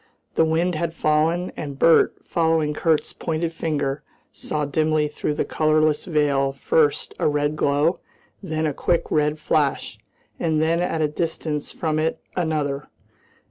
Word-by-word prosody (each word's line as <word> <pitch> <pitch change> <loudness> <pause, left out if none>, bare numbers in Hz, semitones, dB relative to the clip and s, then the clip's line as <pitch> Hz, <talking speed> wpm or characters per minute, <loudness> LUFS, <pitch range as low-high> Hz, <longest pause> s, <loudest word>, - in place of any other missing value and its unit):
The 160 - +3
wind 165 +3 +1
had 165 +1 -2
fallen, 160 +4 +1
and 140 -3 -6
Bert, 165 +3 +5
following 160 -2 +1
Kurt's 155 0 0
pointing 165 0 -2
finger, 145 -4 -2 0.3
saw 150 -1 -3
dimly 155 +1 +1
through 150 0 -3
the - - -1
colourless 155 -1 +2
veil 140 -4 +1
first 145 +2 +1
a - - +2
red 145 0 0
glow, 150 +4 +1 0.4
then 160 -5 -2
a 150 - 0
quick 170 +4 0
red 150 0 +2
flash, 150 -2 0 0.4
and 160 -2 +1
then 165 +2 +2
at 165 -2 -1
a - - +3
little 150 -1 -1
distance 155 -2 -3
from 155 -2 -1
it 160 +1 -1 0.2
another. 150 -5 -1
155 Hz, 150 wpm, -23 LUFS, 150-160 Hz, 0.4 s, Bert